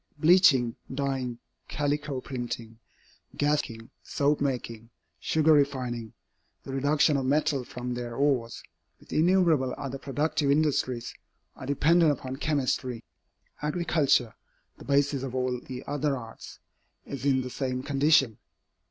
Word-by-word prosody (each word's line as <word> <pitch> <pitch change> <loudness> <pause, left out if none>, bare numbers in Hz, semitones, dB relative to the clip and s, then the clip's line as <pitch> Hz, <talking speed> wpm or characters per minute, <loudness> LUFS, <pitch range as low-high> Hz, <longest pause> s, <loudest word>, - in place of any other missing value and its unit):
Bleaching, 155 -7 +5 0.2
dyeing, 130 -3 -2 0.3
calico 145 -2 -2
printing, 120 -3 -6 0.6
gas 150 +1 +2
making, 115 0 -11
soap 145 0 0
making, 115 -4 -3 0.3
sugar 160 - +3
refining, 125 -6 0 0.5
the 135 - -7
reduction 145 +2 +2
of 135 -1 -2
metals 140 -2 +1
from 125 0 -5
their 120 -1 -5
ores, 135 -4 0 0.4
with - - -12
innumerable 165 -6 +3
other 135 -1 -5
productive 145 +1 -1
industries, 140 -5 +1 0.4
are 130 - -9
dependent 155 +3 +4
upon 130 -1 -5
chemistry. 130 -5 -1 0.6
Agriculture, 150 -6 +1 0.5
the - - -11
basis 140 -1 +2
of 130 -1 -5
all 125 -1 -1
the 125 +1 -8
other 145 -1 -1
arts, 115 -2 -10 0.5
is 135 -3 -7
in 135 -2 +2
the 125 - -6
same 130 -1 -3
condition. 140 -5 +3
135 Hz, 125 wpm, -27 LUFS, 125-145 Hz, 0.6 s, Bleaching